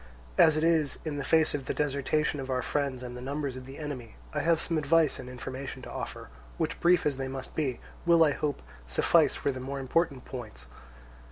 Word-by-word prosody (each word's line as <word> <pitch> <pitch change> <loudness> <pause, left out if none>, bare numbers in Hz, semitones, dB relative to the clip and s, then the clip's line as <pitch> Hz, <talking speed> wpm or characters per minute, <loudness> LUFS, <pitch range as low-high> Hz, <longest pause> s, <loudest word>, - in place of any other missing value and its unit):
As 155 - +6
it 155 - +1
is, 160 -4 +3
in 150 -2 -2
the 140 - -2
face 160 +2 +3
of 140 -2 -3
the - - -1
desertion 145 +1 0
of 135 0 -5
our 130 -1 0
friends 140 -3 -1
and 125 0 -6
the 125 - -7
numbers 140 0 -3
of 130 0 -8
the 135 - -9
enemy, 135 -7 -6 0.2
I 150 - 0
have 165 +1 +3
some 165 -2 0
advice 155 +1 +3
and 125 -1 -7
information 130 +1 -6
to - - -8
offer, - - -6 0.3
which, - - -1
brief 175 0 +4
as 145 -3 +1
they 135 0 -2
must 130 0 -6
be, 135 -6 -1 0.2
will, 170 -1 +6
I 150 - +4
hope, 145 - -2 0.2
suffice - - +4
for 140 - 0
the 130 - -6
more 135 +2 -4
important 135 0 0
points. 110 - -7
140 Hz, 215 wpm, -29 LUFS, 130-155 Hz, 0.3 s, As